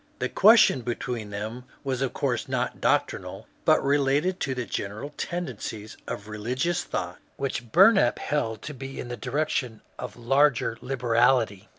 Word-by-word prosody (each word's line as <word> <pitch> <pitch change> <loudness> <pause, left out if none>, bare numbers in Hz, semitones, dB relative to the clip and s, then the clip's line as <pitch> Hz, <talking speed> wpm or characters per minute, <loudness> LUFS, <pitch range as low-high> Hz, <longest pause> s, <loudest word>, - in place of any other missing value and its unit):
The - - -2
question 215 - +6
between 120 -2 -4
them 110 +5 -6 0.2
was 135 -2 -2
of 135 - 0
course - - -2
not - - -2
doctrinal, - - 0 0.2
but - - +4
related 145 +6 +2
to 130 -2 -2
the 125 -1 -3
general 110 +8 -5
tendencies 115 -10 -5
of 105 - -5
religious 125 +10 -1
thought, - - -4 0.2
which 125 -4 -3
Bumap 190 - +6
held 115 -7 -2
to 150 - -6
be 135 0 -8
in 120 - -6
the 120 - -3
direction 125 -2 -2 0.2
of 120 -3 -6
larger 130 -1 +2
liberality. 120 -4 +1
125 Hz, 150 wpm, -26 LUFS, 115-140 Hz, 0.2 s, question